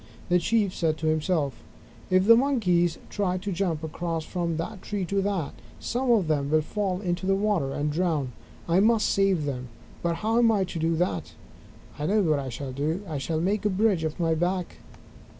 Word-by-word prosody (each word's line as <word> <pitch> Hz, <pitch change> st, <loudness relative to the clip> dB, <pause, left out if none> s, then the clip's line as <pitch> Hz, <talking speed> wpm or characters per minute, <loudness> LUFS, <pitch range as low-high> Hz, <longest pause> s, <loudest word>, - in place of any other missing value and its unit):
The 180 Hz, 0 st, +4 dB
Chief 205 Hz, +1 st, +1 dB
said 160 Hz, -2 st, 0 dB
to 160 Hz, -, -5 dB
himself: 155 Hz, -3 st, 0 dB, 0.5 s
"If 185 Hz, +1 st, +4 dB
the 230 Hz, +2 st, +8 dB
Monkeys 195 Hz, -, +2 dB
try 185 Hz, -3 st, 0 dB
to 200 Hz, +2 st, -4 dB
jump 170 Hz, -4 st, -1 dB
across 165 Hz, 0 st, -3 dB
from 170 Hz, -3 st, -2 dB
this 180 Hz, +6 st, -4 dB
tree 205 Hz, -3 st, -3 dB
to 200 Hz, +2 st, 0 dB
that, 195 Hz, -6 st, -2 dB, 0.3 s
some 250 Hz, +2 st, -2 dB
of 200 Hz, -8 st, +2 dB
them 145 Hz, -3 st, 0 dB
will 155 Hz, 0 st, +3 dB
fall 190 Hz, +1 st, -2 dB
into 180 Hz, -1 st, -2 dB
the 195 Hz, -, +3 dB
water 195 Hz, -9 st, 0 dB
and 150 Hz, +2 st, -1 dB
drown. 155 Hz, -5 st, 0 dB, 0.4 s
I 170 Hz, +2 st, +3 dB
must 220 Hz, +2 st, +4 dB
save 195 Hz, -6 st, +2 dB
them, 130 Hz, -3 st, -4 dB, 0.3 s
but 170 Hz, -1 st, 0 dB
how 220 Hz, +7 st, +1 dB
am 230 Hz, -1 st, +5 dB
I 205 Hz, -3 st, +2 dB
to 175 Hz, -2 st, -5 dB
do 165 Hz, +1 st, +1 dB
it? 90 Hz, -, -1 dB, 0.7 s
I 150 Hz, -, -1 dB
know 210 Hz, +1 st, +3 dB
what 155 Hz, -4 st, +2 dB
I 135 Hz, -1 st, -4 dB
shall 130 Hz, +2 st, -5 dB
do. 155 Hz, +8 st, -2 dB
I 155 Hz, -4 st, -3 dB
shall 155 Hz, +3 st, -2 dB
make 195 Hz, +5 st, 0 dB
a 210 Hz, -, +2 dB
bridge 195 Hz, -3 st, +2 dB
of 160 Hz, +2 st, -3 dB
my 165 Hz, -1 st, +2 dB
back." 180 Hz, +2 st, -1 dB
175 Hz, 205 wpm, -26 LUFS, 155-200 Hz, 0.7 s, the